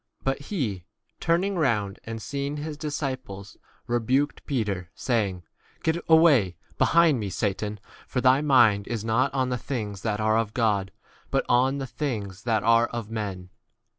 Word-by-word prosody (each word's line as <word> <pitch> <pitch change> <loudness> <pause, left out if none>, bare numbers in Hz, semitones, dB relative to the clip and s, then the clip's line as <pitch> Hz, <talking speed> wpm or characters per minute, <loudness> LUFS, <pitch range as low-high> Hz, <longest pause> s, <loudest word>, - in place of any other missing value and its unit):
But 135 +1 -1
he, 110 - -2 0.4
turning 180 +4 +1
round 105 -9 0
and 115 0 -5
seeing 140 +5 -4
his 150 +1 -5
dis 150 -1 -4
ciples, 125 -8 -5 0.3
rebuked 125 +5 0
Peter, 100 - -2
saying, 105 -7 -1
b - - -33 0.4
Get 160 +2 0
away 145 - +5 0.2
behind 165 -6 +4
me, 105 -2 -3
Satan, 105 +1 -2 0.3
for 125 - -1
thy 130 +2 +4
mind 120 -9 +4
is 115 -2 -3
not 120 +5 +2
on 130 -2 0
the 125 -1 -2
things 105 -8 -4
that 105 -2 -1
are 110 +1 +3
of 110 -2 -3
God, 105 -5 +1 0.4
but - - 0
on 130 +3 +3
the 135 - -3
things 110 -7 -4
that 115 -2 +1
are 115 +1 +4
34 120 - -4
of 110 -1 -10
men. 100 -5 -4
120 Hz, 165 wpm, -26 LUFS, 105-140 Hz, 0.4 s, away